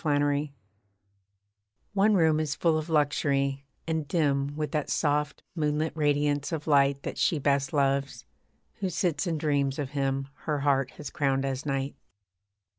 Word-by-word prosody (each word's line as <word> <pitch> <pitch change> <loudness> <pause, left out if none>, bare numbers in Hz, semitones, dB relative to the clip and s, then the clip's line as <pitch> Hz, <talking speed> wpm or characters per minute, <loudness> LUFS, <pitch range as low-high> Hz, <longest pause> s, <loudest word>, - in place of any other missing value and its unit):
TWO 155 - 0
ROOMS 145 0 +1 1.4
One 205 +1 +4
room 160 -4 +4
is 150 -2 -1
full 165 -2 +2
of 155 +1 -2
luxury, 140 -2 +1 0.2
and 160 -2 -2
dim 140 -3 +1
With 150 0 -3
that 150 -3 -1
soft 150 -1 0
moonlit 155 -1 0
radiance 145 -1 +1
of 155 -3 -3
light 140 -2 +3
That - - -5
she 165 - +2
best 140 +1 +1
loves, 140 -2 0 0.5
who 195 -2 -1
sits 170 -3 -1
and 165 -2 -1
dreams 140 -3 0
of 140 -3 -3
him 135 -1 -1 0.2
Her 150 -3 -1
heart 135 -2 +2
has 135 - -7
crowned 135 -5 0
as 135 +2 -3
knight. 135 0 -1
145 Hz, 155 wpm, -28 LUFS, 140-155 Hz, 1.4 s, One